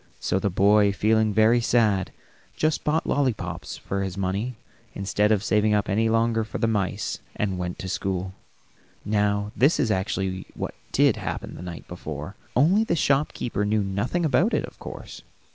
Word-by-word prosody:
So 95 - 0
the 100 - 0
boy, 100 +2 +4
feeling 110 +2 +2
very 110 +3 +4
sad, 110 -5 +2 0.5
just 155 0 0
bought 155 +2 +1
lollipops 95 - -1
for 100 0 -3
his 95 -1 -4
money, 100 +6 -2 0.4
instead 100 +2 +1
of 105 -2 +2
saving 105 -1 +2
up 105 0 +1
any 110 +3 +2
longer 115 0 +2
for 110 - -6
the - - +1
mice, 100 -2 -1 0.2
and 95 -3 -1
went 90 0 -3
to 95 - -6
school. 95 0 -2 0.7
Now 105 0 +1
this 140 +6 +3
is 110 - +2
actually 95 -1 -2
what - - -4 0.2
did - - +4
happen - - -5
the - - -9
night 90 -2 -8
before, 80 +1 -7 0.2
only 175 - +4
the 195 - 0
shopkeeper 135 -7 0
knew 105 0 +1
nothing 100 - -1
about 160 - +3
it, - - 0
of - - -16
course. - - -9
105 Hz, 170 wpm, -25 LUFS, 95-115 Hz, 0.7 s, boy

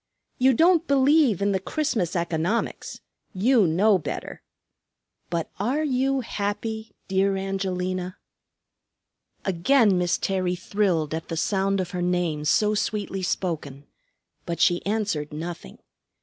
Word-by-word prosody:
You 260 0 +4
don't 335 +3 +4
believe 275 - +4
in 200 - +2
the 190 - +1
Christmas 220 - -1
economics, 170 +5 -2 0.3
you 220 +1 +4
know 190 +5 +3
better. - - -6 0.9
But 170 -1 -3
are 260 +10 0
you 270 -1 +1
happy, 220 0 -4
dear 195 0 +1
Angelina?" 185 -1 -3 1.3
Again 195 +2 +3
Miss 175 -1 +1
Terry 185 -2 -1
thrilled 180 -5 0
at 160 0 -4
the 165 - -4
sound 195 +2 +1
of 180 -1 -3
her 180 -2 -3
name 175 -4 0
so 210 +7 +3
sweetly 205 -2 -2
spoken; 155 -7 -3 0.6
but 170 -1 -3
she 175 -2 +3
answered 200 -9 -1
nothing. 160 - -7
195 Hz, 120 wpm, -25 LUFS, 175-220 Hz, 1.3 s, You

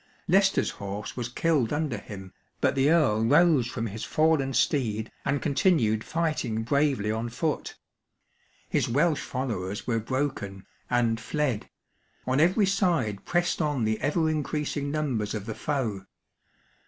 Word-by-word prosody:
Leicester's 190 +2 +3
horse 100 +4 -6
was 120 -2 -3
killed 140 -2 +1
under 145 -7 -1
him, 95 -2 -10 0.3
but - - +2
the 135 +2 +3
Earl 140 -10 +3
rose 145 0 +4
from 115 -2 -3
his 110 0 -5
fallen 155 -4 +2
steed, 115 -6 0
and 140 0 -1
continued 135 - +2
fighting 155 -9 -1
bravely 135 -4 +1
on 110 +2 -2
foot. 145 +6 -2 0.9
His - - 0
Welsh 150 +4 +2
followers 105 -7 -3
were 115 -2 0
broken, 115 -6 -3 0.2
and 115 -2 +2
fled 130 -2 -2 0.3
\ - - -39
on 130 +2 +1
every 185 +6 +4
side 170 - 0
pressed 175 0 0
on 145 -6 0
the 110 0 0
ever 160 +4 +1
increasing 150 -2 -2
numbers 130 -9 -1
of 105 -2 -5
the 110 - -4
foe. 110 -6 -2
130 Hz, 140 wpm, -27 LUFS, 110-155 Hz, 0.9 s, rose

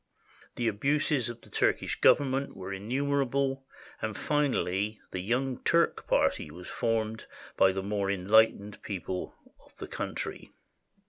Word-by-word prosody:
The 120 - -1
abuses 135 +3 +1
of 120 0 -8
the - - -19
Turkish - - 0
Government 135 0 +3
were 95 +1 -5
innumerable, 135 +4 0 0.3
and 110 -2 -3
finally 110 -8 0
the 95 - -3
Young 125 +6 -1
Turk 170 0 +2
Party - - +2
was 90 +4 -10
formed 110 -2 -1 0.3
by 95 - +5
the 95 0 -3
more 100 0 -1
enlightened 100 +2 +3
people 95 -2 -4 0.3
of - - -24
the - - -7
country. - - -5
110 Hz, 130 wpm, -29 LUFS, 100-135 Hz, 0.3 s, by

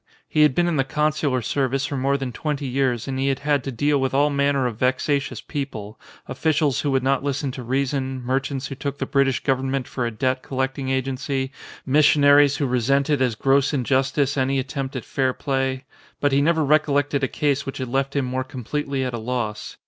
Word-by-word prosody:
He 155 - +1
had 150 -4 +5
been 175 0 +2
in 170 -3 0
the 135 - +3
con 150 +3 +1
sular 140 -6 -1
service 135 0 0
for 140 - -3
more 135 +1 +1
than 135 -2 -4
twenty 145 +3 -3
years 130 -2 0
and 130 -1 -3
he 135 - +1
had 135 -1 +1
had 145 -2 +1
to 135 - -3
deal 145 +3 +1
with 135 0 0
all 145 +1 +3
manner 140 -1 +1
of 120 -3 -2
vexatious 130 -1 0
people, 115 -8 -6 0.3
officials 150 0 +1
who 145 - -1
would 135 -2 +1
not 135 0 +1
listen 140 -1 -1
to 125 - -7
reason, 130 +1 -1
merchants 135 +2 -1
who 135 - -5
took 140 +1 -4
the - - -2
Brit 140 -1 +2
ish 135 - -1
Government 135 -1 0
for 120 -2 -2
a - - -1
debt 130 +3 -1
collecting 135 0 -3
agency, 130 0 -2 0.3
mis 145 +2 +4
sionaries 145 -1 +5
who 145 - 0
resented 135 +3 +1
as 125 -4 +1
gross 135 +4 +2
injustice 135 +2 +1
any 135 +1 +1
at 130 0 -2
tempt 135 -1 -4
at 130 - -4
fair 130 -1 0
play; 135 -1 -2 0.3
but 145 - +2
he 140 +1 +3
never 160 0 +2
recollected 145 -1 +2
a - - +3
case 140 0 -1
which 135 - -5
had 130 - -3
left 135 +3 -1
him 140 -2 +1
more 130 +1 -2
completely 135 +1 -3
at 125 -1 -3
a 120 - -3
loss. 110 -2 -4
135 Hz, 215 wpm, -23 LUFS, 130-140 Hz, 0.3 s, had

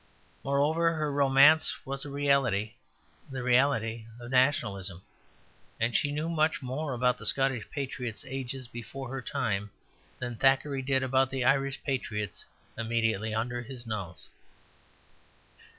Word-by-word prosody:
Moreover, 155 +5 +2
her 155 -2 -1
romance 140 +2 +5
was 135 +1 -4
a - - -6
reality, 135 -7 +1 0.6
the 130 -2 -5
reality 120 -3 +2
of 120 +1 -9
nationalism; 100 - +2 0.8
and 115 +1 0
she 145 - +2
knew 150 +2 -2
much 155 -3 +1
more 135 +3 -3
about 125 0 +1
the - - -8
Scottish 135 -5 +1
patriots 125 -5 -4
ages 130 -1 -4
before 120 +3 -7
her 135 0 -4
time 105 -7 -2 0.5
than 120 -1 -5
Thackeray 135 +2 +2
did 135 0 +1
about 130 0 +2
the 130 -2 -2
Irish 135 +1 +1
patriots 105 -8 -3 0.3
immediately 115 -2 0
under 120 +2 -2
his 125 0 -9
nose. 100 -6 -5
130 Hz, 130 wpm, -29 LUFS, 115-140 Hz, 0.8 s, romance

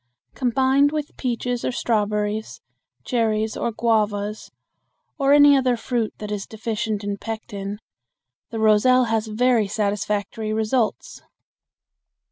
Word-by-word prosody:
Combined 265 +3 +2
with 300 -1 -4
peaches 245 -1 -2
or - - 0
strawberries, 210 -2 -1 0.5
cherries 220 -3 0
or 235 - -1
guavas, 215 -2 -1 0.7
or 275 0 +3
any 290 0 +7
other 255 -3 +2
fruit 230 -2 -2
that 210 0 -6
is 205 -1 -4
deficient 220 -1 -3
in 200 0 -3
pectin, 205 -2 -6 0.7
the 230 - -5
roselle 220 +4 +4
has 225 -2 -1
very 225 0 +2
satisfactory 210 +1 -2
results. 220 - -1
220 Hz, 110 wpm, -22 LUFS, 210-245 Hz, 0.7 s, any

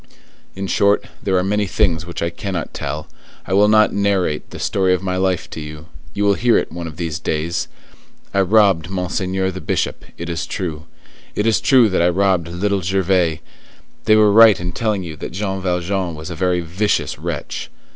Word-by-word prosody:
In 95 +1 -4
short, 100 +2 +2 0.2
there 95 -1 +1
are 90 - +2
many 105 +1 0
things 85 -4 0
which 85 - -4
I 85 - -1
cannot 90 0 -4
tell. 75 0 -4 0.4
I - - -3
will 100 +2 +5
not 110 0 +4
narrate 100 -6 0
the - - -9
story 95 -3 +1
of 90 - -6
my 90 -1 -1
life 95 -2 0
to - - -6
you; 75 0 -9 0.3
you 105 - 0
will 100 - +5
hear 120 +3 +3
it - - -2
one 85 0 -5
of 80 -1 -9
these 80 -2 -3
days. 80 +1 -2 0.7
I 100 - +3
robbed 95 -4 +3
Monseigneur 95 0 -1
the 95 - -7
Bishop, - - -2
it 85 - -6
is 80 -2 -3
true; 80 -4 -4 0.5
it 105 - 0
is 110 -1 +2
true 125 -1 +5
that 95 - +1
I 85 - +4
robbed 90 -2 +1
Little 95 +3 -1
Gervais; 90 -3 +1 0.6
they 110 - +5
were 105 -1 +5
right 110 -1 +7
in 90 0 -3
telling 105 0 -1
you 80 -3 -7
that - - -7
Jean 95 0 -3
Valjean 90 -1 -1
was 80 +3 -7
a - - -5
very 90 +2 +1
vicious 90 +6 -1
wretch. - - -5
95 Hz, 195 wpm, -19 LUFS, 85-100 Hz, 0.7 s, right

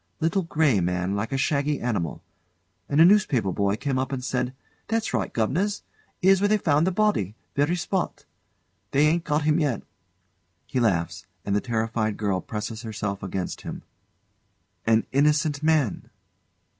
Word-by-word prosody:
Little 165 +4 +1
grey 155 - +2
man 90 +2 -1
like 105 +5 -2
a 135 - 0
shaggy 145 +1 +1
animal. 105 -10 -2 0.7
And 145 - +2
a 165 - +9
newspaper 170 - +3
boy 100 +2 +1
came 135 +2 -1
up 130 +1 -2
and 130 -2 -3
said: 125 0 -1 0.3
"That's 225 0 -1
right, - - -1
guv'nors! 180 - 0 0.4
'Ere's 190 0 +5
where 205 - +4
they 215 +1 +3
found 155 -3 +2
the - - +2
body 175 - +1 0.2
very 145 +5 +2
spot. 180 +1 -2 0.6
They 145 +2 +3
'yn't 165 +2 +2
got 150 0 0
'im 155 +1 +3
yet." 145 -8 0 0.8
[He 130 - -2
laughs; 90 -5 0 0.2
and 100 - 0
the 105 - +2
terrified 110 -3 -1
girl 100 -3 0
presses 110 +1 -5
herself 105 -3 -4
against 95 -1 -4
him.] - - -7 1.0
An 110 0 +4
innocent 150 +1 +2
man! 155 -8 +1
135 Hz, 155 wpm, -25 LUFS, 105-160 Hz, 1.0 s, a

